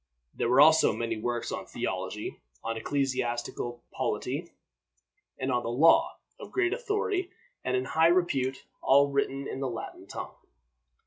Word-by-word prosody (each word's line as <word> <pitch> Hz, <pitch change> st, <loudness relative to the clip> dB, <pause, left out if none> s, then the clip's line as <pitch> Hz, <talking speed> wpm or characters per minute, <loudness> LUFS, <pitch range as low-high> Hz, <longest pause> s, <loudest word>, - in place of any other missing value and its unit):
There 120 Hz, -, -1 dB
were 130 Hz, +3 st, +6 dB
also 160 Hz, +1 st, +6 dB
many 115 Hz, -1 st, -2 dB
works 120 Hz, +2 st, -2 dB
on -, -, -5 dB
theology, -, -, -4 dB, 0.2 s
on 115 Hz, -, -2 dB
ecclesiastical 120 Hz, -1 st, -2 dB
polity, -, -, -2 dB, 0.9 s
and 130 Hz, 0 st, -1 dB
on 120 Hz, -1 st, +1 dB
law, 130 Hz, +8 st, +4 dB, 0.2 s
of -, -, -9 dB
great 375 Hz, -1 st, +1 dB
authority 420 Hz, -5 st, -1 dB, 0.3 s
and 130 Hz, 0 st, +1 dB
in 130 Hz, -, -1 dB
high 160 Hz, +4 st, +4 dB
repute, 140 Hz, -7 st, +1 dB, 0.2 s
all 140 Hz, +1 st, +5 dB
written 140 Hz, 0 st, -1 dB
in -, -, -5 dB
the 135 Hz, -1 st, -1 dB
Latin 115 Hz, -2 st, -7 dB
tongue. -, -, -6 dB
135 Hz, 140 wpm, -29 LUFS, 120-160 Hz, 0.9 s, were